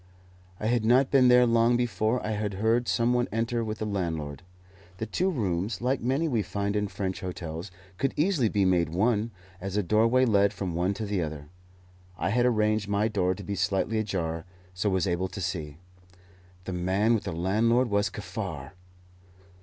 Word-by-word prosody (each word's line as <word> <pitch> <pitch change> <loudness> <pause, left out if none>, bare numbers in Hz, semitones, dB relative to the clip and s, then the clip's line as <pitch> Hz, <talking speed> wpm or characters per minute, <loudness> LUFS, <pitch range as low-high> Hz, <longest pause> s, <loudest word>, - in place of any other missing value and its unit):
I - - -4
had 120 0 +2
not 125 +4 +4
been 130 -2 +6
there 125 0 +6
long 115 0 +3
before 120 0 0
I 110 - -1
heard 110 +3 0
some 120 +1 +2
one 125 0 +1
enter 115 +1 -1
with 110 0 -4
the 110 - -3
landlord. 85 -8 -3 0.6
The 110 - -3
two 180 - 0
rooms, 100 - -1
like 125 +2 0
many 135 +7 +1
we 120 -7 +1
find 100 0 -2
in 105 0 0
French 95 -2 -4
hotels, 85 0 -5 0.3
could 135 - 0
easily 150 - +2
be 100 -2 +1
made 90 -3 +2
one, 105 +6 +1 0.3
as 95 +1 -3
a 105 - +2
doorway 115 +7 +3
led 100 -3 +3
from 95 -4 -4
one 90 +4 0
to 110 - -4
the 100 -3 -1
other. 75 -2 -5 0.7
I - - -1
had 120 +2 +3
arranged 110 -2 +1
my 105 +2 +1
door 95 -3 0
to - - -9
be 100 - -4
slightly 95 +3 0
ajar, 85 -6 -2 0.3
so 90 +3 0
was 95 -1 +1
able 90 0 0
to 100 - -8
see. 80 -5 -4 0.9
The 95 - -5
man 95 +6 +1
with 110 - -1
the - - -2
landlord 110 +9 +2
was 100 0 +2
Kaffar! 90 -8 -6
105 Hz, 185 wpm, -27 LUFS, 95-115 Hz, 0.9 s, been